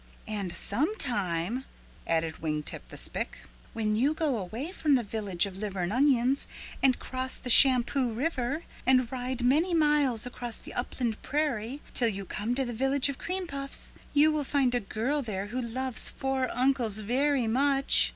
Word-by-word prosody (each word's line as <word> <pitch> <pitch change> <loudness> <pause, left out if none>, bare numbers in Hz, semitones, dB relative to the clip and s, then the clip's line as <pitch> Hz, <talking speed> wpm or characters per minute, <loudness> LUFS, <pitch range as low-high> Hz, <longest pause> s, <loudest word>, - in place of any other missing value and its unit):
"And 205 -4 -3
sometime," 230 - +2 0.4
added 165 -1 -1
Wing 150 -1 -2
Tip - - -6
the - - -8
Spick, - - -2 0.3
"when 215 -1 -1
you 275 +8 +1
go 295 -8 0
away 225 - -6
from 305 -6 +1
the 245 - +1
Village 205 -4 0
of 195 -1 -8
Liver 200 -3 -4
and 175 +3 -2
Onions 265 0 +3 0.3
and 260 -2 +4
cross 260 0 -2
the 250 - +1
Shampoo 255 0 +6
River 275 +3 -2 0.2
and 255 -2 +3
ride 255 -1 -4
many 315 +8 +2
miles 295 -7 +2
across 245 -1 -4
the - - -10
upland 240 -2 -3
prairie 280 -3 -2
till 235 -2 +2
you 200 -2 -5
come 220 +6 -3
to 265 0 0
the 240 - -5
Village 270 +3 +1
of 275 - -5
Cream 370 +1 -3
Puffs, 275 -3 -3 0.2
you 300 +2 +5
will 305 -1 -1
find 270 -2 +1
a 245 - +2
girl 240 +7 -2
there 200 -6 -4
who 245 +5 -4
loves 255 +1 -1
four 265 -1 -2
uncles 250 -4 +1
very 255 +4 +1
much. 275 +4 +2
250 Hz, 170 wpm, -28 LUFS, 220-275 Hz, 0.4 s, Shampoo